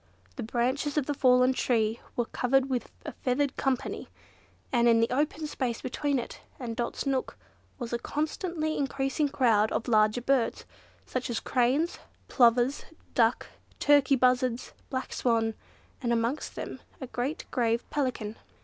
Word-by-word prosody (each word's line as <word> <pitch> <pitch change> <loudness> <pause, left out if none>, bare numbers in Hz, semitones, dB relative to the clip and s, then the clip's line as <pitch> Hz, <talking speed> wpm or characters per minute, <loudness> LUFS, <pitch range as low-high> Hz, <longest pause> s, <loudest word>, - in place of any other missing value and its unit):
The 260 - -5
branches 255 +6 -1
of 295 - +2
the 290 - -1
fallen 255 -1 +4
tree 225 -3 +1 0.2
were 240 - +1
covered 265 +3 +1
with 250 -2 -1 0.2
a - - -4
feathered 265 +1 -1
company, 270 -1 -2 0.6
and 240 -1 +4
in 230 -1 +5
the 230 +1 +2
open 300 +4 0
space 255 -6 -2
between 280 +2 -1
it 240 - -6 0.2
and 235 -3 -4
Dot's 240 +4 -3
nook, 270 -2 -1 0.4
was 240 -2 -5
a 235 - 0
constantly 315 +3 -2
increasing 275 +1 0
crowd 225 -6 +3
of 230 - -2
larger 215 0 +3
birds, 260 -1 +1 0.4
such 255 -1 -3
as 235 - -1
cranes, 265 +7 +1 0.3
plover, 240 0 +5 0.4
duck, 230 0 +3 0.3
turkey 285 -1 +5
buzzards, 250 -1 +1 0.2
black 260 -2 -3
swan, 225 -2 +1 0.5
and 240 -2 0
amongst 235 +5 -1
them - - -6 0.2
a 265 - -5
great 255 +4 -3
grave 230 -2 0
Pelican. 245 -6 -2
255 Hz, 150 wpm, -28 LUFS, 235-275 Hz, 0.6 s, in